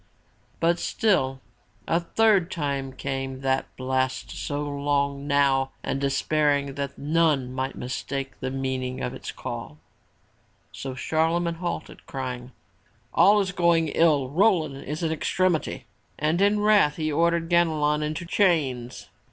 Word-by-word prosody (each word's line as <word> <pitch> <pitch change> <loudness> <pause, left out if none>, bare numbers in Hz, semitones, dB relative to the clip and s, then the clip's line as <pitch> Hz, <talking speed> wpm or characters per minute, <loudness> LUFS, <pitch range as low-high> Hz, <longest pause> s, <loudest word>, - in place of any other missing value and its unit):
But 170 +1 +2
still 135 - +1 0.5
a 165 - +2
third 195 0 +3
time 140 -6 -2
came 135 -1 -4
that 135 0 0
blast 130 0 -1
so 145 0 -3
long 140 -1 -1
now 140 -2 +2
and 135 - -2
despair 145 +2 +2
ing 140 -1 -5
that 140 0 -4
none 150 -4 +1
might 130 +1 -3
mistake 135 +2 -4
the 130 - -3
meaning 130 -1 -3
of - - -2
its - - -7
call. 75 +2 -7 0.9
So 135 -1 -6
Charle 160 +4 +1
magne 170 -1 -2
halted, 175 -1 -5
crying: 125 -2 -5 0.6
"All 205 +2 +6
is 195 -1 -2
going 170 -3 +2
ill. 145 -5 +3
Roland 160 -6 +2
is 150 +4 -4
in 160 - +1
extremity!" 175 +1 0 0.3
And 155 +4 +1
in 205 +1 +3
wrath 205 -8 +4
he 155 -1 -2
ordered 170 +2 +2
Ganelon 155 -3 +2
into 155 +3 -3
chains. 150 - 0
145 Hz, 135 wpm, -25 LUFS, 135-170 Hz, 0.9 s, All